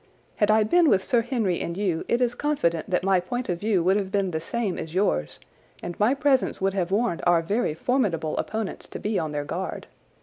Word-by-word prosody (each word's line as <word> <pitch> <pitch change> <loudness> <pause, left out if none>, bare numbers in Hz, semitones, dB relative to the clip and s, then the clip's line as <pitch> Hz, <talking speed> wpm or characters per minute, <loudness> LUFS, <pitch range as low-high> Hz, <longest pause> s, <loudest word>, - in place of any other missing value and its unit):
Had 210 -2 +2
I 215 0 +5
been 330 +9 +4
with 190 -4 +3
Sir 240 - +2
Henry 225 -7 -1
and 170 +1 -4
you 185 -5 -1
it 240 - +1
is 245 -1 +2
confident 225 - -1
that 180 -1 +1
my 190 -1 +3
point 245 +7 -4
of 175 -1 -1
view 205 -4 +1
would 190 +3 +3
have 195 -2 -3
been 195 -2 0
the 160 -1 -3
same 210 +2 -2
as 160 +2 -7
yours, 75 - 0 0.4
and 175 - -4
my 220 +6 +3
presence 275 -2 +1
would 195 0 0
have 185 -3 -1
warned 205 -2 0
our 170 -1 +4
very 200 -2 0
formidable 170 - 0
opponents 220 -2 -4
to - - -8
be 210 -1 -1
on 155 -2 -3
their 145 -1 -3
guard. 180 +5 -4
195 Hz, 225 wpm, -25 LUFS, 170-230 Hz, 0.4 s, I